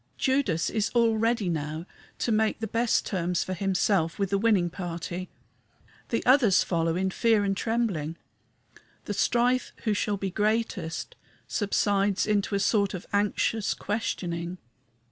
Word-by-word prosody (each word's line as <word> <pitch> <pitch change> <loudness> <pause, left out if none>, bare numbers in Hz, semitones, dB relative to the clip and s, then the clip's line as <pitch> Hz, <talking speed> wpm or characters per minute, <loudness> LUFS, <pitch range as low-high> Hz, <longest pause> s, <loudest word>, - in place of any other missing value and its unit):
Judas 260 - +1
is 215 -1 0
all 230 -2 +4
ready 225 -2 +1
now 155 0 -3 0.3
to 235 - -1
make 220 0 +1
the 225 - -2
best 230 +2 +1
terms 180 -2 -1
for 185 - -4
himself 185 -2 +1
with 195 -2 -1
the 200 - +2
winning 205 -5 +3
party. 175 0 -5 0.8
The 230 - -1
others 245 -8 +5
follow 165 -2 0
in 190 +1 0
fear 220 0 +3
and 195 -1 0
trembling. 195 -9 -1 0.9
The - - -3
strife 245 +1 +1
who 215 - +1
shall 205 0 0
be 195 -1 -3
greatest 210 -5 -1 0.3
subsides 200 -1 +1
into 205 -1 0
a - - +1
sort 200 -1 +2
of 180 - -7
anxious 205 +1 +1
questioning. 175 -5 -3
200 Hz, 145 wpm, -27 LUFS, 180-225 Hz, 0.9 s, others